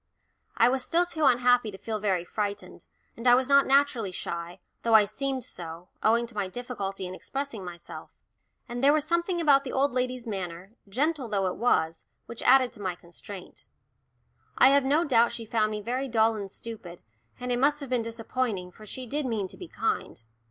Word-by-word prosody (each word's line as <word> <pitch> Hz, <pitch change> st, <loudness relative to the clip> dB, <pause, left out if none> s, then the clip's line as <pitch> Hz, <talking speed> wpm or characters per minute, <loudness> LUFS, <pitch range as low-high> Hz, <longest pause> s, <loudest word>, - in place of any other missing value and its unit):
I 230 Hz, -, +6 dB
was 260 Hz, +1 st, +1 dB
still 345 Hz, +5 st, +2 dB
too 320 Hz, -3 st, -1 dB
unhappy 245 Hz, -2 st, +4 dB
to 195 Hz, -, -9 dB
feel 215 Hz, +2 st, -4 dB
very 190 Hz, -4 st, 0 dB
frightened, 205 Hz, +1 st, -4 dB, 0.3 s
and 230 Hz, +2 st, -3 dB
I 245 Hz, -, +8 dB
was 255 Hz, 0 st, +1 dB
not 280 Hz, 0 st, +5 dB
naturally 270 Hz, -7 st, +3 dB
shy, 170 Hz, -1 st, -5 dB, 0.2 s
though 230 Hz, -1 st, +3 dB
I 215 Hz, -1 st, +8 dB
seemed 270 Hz, +3 st, -3 dB
so, 170 Hz, -2 st, -7 dB
owing 235 Hz, +2 st, +3 dB
to 235 Hz, -, -11 dB
my 205 Hz, -2 st, -2 dB
difficulty 195 Hz, -3 st, -5 dB
in 180 Hz, -, -6 dB
expressing 270 Hz, 0 st, -5 dB
myself. 175 Hz, -1 st, -10 dB, 0.5 s
And 245 Hz, +2 st, -5 dB
there 285 Hz, +1 st, +6 dB
was 305 Hz, -1 st, +1 dB
something 340 Hz, +2 st, 0 dB
about 285 Hz, -4 st, +5 dB
the 265 Hz, -, -5 dB
old 275 Hz, +2 st, +2 dB
lady's 250 Hz, -1 st, -2 dB
manner, 185 Hz, -3 st, -5 dB, 0.2 s
gentle 280 Hz, +3 st, 0 dB
though 195 Hz, -2 st, +1 dB
she -, -, -10 dB
was, 165 Hz, -9 st, +1 dB, 0.2 s
which 235 Hz, -, -8 dB
added 260 Hz, -1 st, +5 dB
to 215 Hz, -, -12 dB
my 185 Hz, -3 st, -2 dB
constraint. 175 Hz, +3 st, -11 dB, 0.9 s
I 260 Hz, -, +7 dB
have 280 Hz, 0 st, +4 dB
no 295 Hz, +5 st, +3 dB
doubt 235 Hz, -6 st, +3 dB
she 230 Hz, -, -6 dB
found 215 Hz, -1 st, +1 dB
me 210 Hz, -1 st, -4 dB
very 255 Hz, +4 st, -2 dB
dull 225 Hz, -2 st, +3 dB
and 200 Hz, -2 st, -6 dB
stupid, 200 Hz, -8 st, -9 dB, 0.4 s
and 250 Hz, 0 st, -3 dB
it 245 Hz, -, +1 dB
must 290 Hz, +3 st, +3 dB
have 275 Hz, -3 st, -8 dB
been 250 Hz, -2 st, +2 dB
disappointing, 225 Hz, -4 st, -3 dB
for 215 Hz, +4 st, -14 dB
she 255 Hz, +4 st, -6 dB
did 280 Hz, +3 st, -2 dB
mean 215 Hz, -5 st, -1 dB
to -, -, -10 dB
be 360 Hz, -, -8 dB
kind. 225 Hz, -, -3 dB
235 Hz, 200 wpm, -27 LUFS, 200-265 Hz, 0.9 s, I